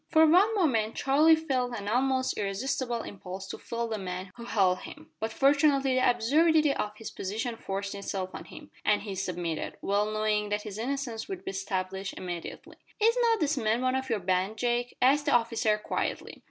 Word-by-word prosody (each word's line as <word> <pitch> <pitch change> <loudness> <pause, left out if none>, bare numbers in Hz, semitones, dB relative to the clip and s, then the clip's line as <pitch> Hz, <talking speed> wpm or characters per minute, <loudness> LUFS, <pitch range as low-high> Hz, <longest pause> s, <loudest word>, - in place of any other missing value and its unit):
For 320 0 +6
one 375 +8 +5
moment 230 - +1
Charlie 300 +4 +5
felt 255 -6 -1
an 200 -1 -6
almost 260 +3 +1
irresistible 235 +4 -2
impulse 190 -1 -7
to - - -6
fell 235 0 -3
the 220 -2 -3
men 185 0 -5
who 235 - -9
held 190 -5 +2
him, 310 +1 -11
but 220 +1 -2
fortunately 275 +1 +3
the 255 0 +4
absurdity 300 +6 +3
of 210 -5 -3
his 225 - -7
position 220 +5 -3
forced 195 -2 -4
itself 195 -2 -4
on - - -7
him, - - -12
and 210 -1 +2
he 205 -2 -5
submitted, 175 -4 -3
well 205 +2 0
knowing 215 -1 0
that 210 0 -1
his 210 -1 -7
innocence 250 -2 -3
would 385 -2 -6
be - - -2
established 195 0 -3
immediately. 175 -2 -7 0.2
"Is 455 +2 +4
not 460 -2 +3
this 300 -1 +1
man 225 +2 +1
one 255 0 +2
of 265 0 -2
your 225 - +1
band, 185 +3 0
Jake?" 245 +1 -1
asked 290 +3 +4
the 285 - +3
officer 230 -2 +2
quietly. 210 - -3
225 Hz, 190 wpm, -28 LUFS, 200-270 Hz, 0.2 s, For